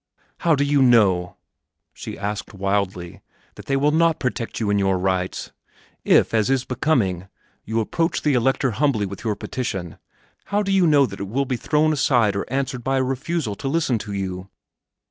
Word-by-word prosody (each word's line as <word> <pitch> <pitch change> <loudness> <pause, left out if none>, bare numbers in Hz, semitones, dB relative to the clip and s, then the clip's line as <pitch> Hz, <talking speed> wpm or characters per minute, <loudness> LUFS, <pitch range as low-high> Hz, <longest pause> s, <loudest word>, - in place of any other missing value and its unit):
"How 165 -2 +3
do 140 - +1
you 145 -1 +2
know," 100 -8 +3 0.6
she - - -8
asked 105 +1 -5
wildly, 95 -3 -2 0.3
"that - - -13
they 135 - +1
will 145 +2 +2
not 165 0 +2
protect 125 -2 -3
you 105 -3 0
in 100 - +2
your 95 -1 +2
rights? 95 0 -2 0.5
If, - - +3
as 110 0 +2
is 135 -1 +1
becoming, 115 - 0 0.4
you 110 +1 -1
approach 165 - -1
the 150 - +2
Elector 130 +1 +1
humbly 120 -4 +1
with 100 0 -8
your 110 -3 -1
petition, 95 -7 -5 0.5
how 205 +1 0
do 195 - -2
you 190 -3 +4
know 145 -3 +5
that 100 -5 -8
it 100 - -4
will 135 +7 -1
be 130 - -2
thrown 155 +5 +1
aside 120 -8 +2
or 100 - -4
answered 130 -2 -2
by 135 +1 0
a 130 - +2
refusal 135 -1 -2
to - - -5
listen 135 -5 +1
to 105 0 -7
you?" 95 -1 -4
120 Hz, 185 wpm, -22 LUFS, 100-140 Hz, 0.6 s, know